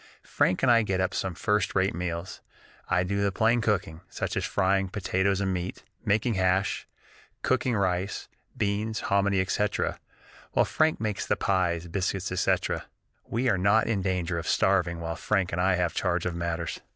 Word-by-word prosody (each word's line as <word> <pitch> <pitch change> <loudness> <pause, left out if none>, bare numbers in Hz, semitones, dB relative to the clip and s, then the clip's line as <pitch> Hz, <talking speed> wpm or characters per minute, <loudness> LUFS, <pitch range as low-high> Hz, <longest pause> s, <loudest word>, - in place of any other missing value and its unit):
Frank 90 - +1
and 125 - +6
I 115 -1 +6
get 95 -4 -1
up 95 +1 0
some 95 -2 -2
first 105 +1 0
rate 95 +1 +2
meals. 85 0 -4 0.5
I 90 - +3
do 100 +2 -1
the 100 0 +2
plain 115 +5 +2
cooking, 100 -7 -1
such - - -3
as - - -1
frying 95 0 +1
potatoes 95 0 0
and 95 -1 0
meat, 90 0 -4 0.2
making 110 +3 +1
hash, 95 0 +1 0.6
cooking 130 -2 +1
rice, 95 -1 -1 0.3
beans, 105 0 -1
hominy, 100 0 +2
etc., 105 +3 0 0.5
while - - +4
Frank 155 0 +1
makes 105 -2 -2
the - - +2
pies, 90 -3 0
biscuits, 95 +1 -2
etc. 90 - 0 0.4
We 120 +3 -1
are 100 -6 +2
not 100 +4 +4
in 105 -4 0
danger 90 -2 -1
of 80 - -6
starving 90 -3 +2
while 85 0 -3
Frank 95 -1 0
and 90 - -1
I 95 0 +3
have 90 -1 0
charge 90 -2 0
of 90 - -1
matters! 85 -1 -3
95 Hz, 175 wpm, -27 LUFS, 90-105 Hz, 0.6 s, and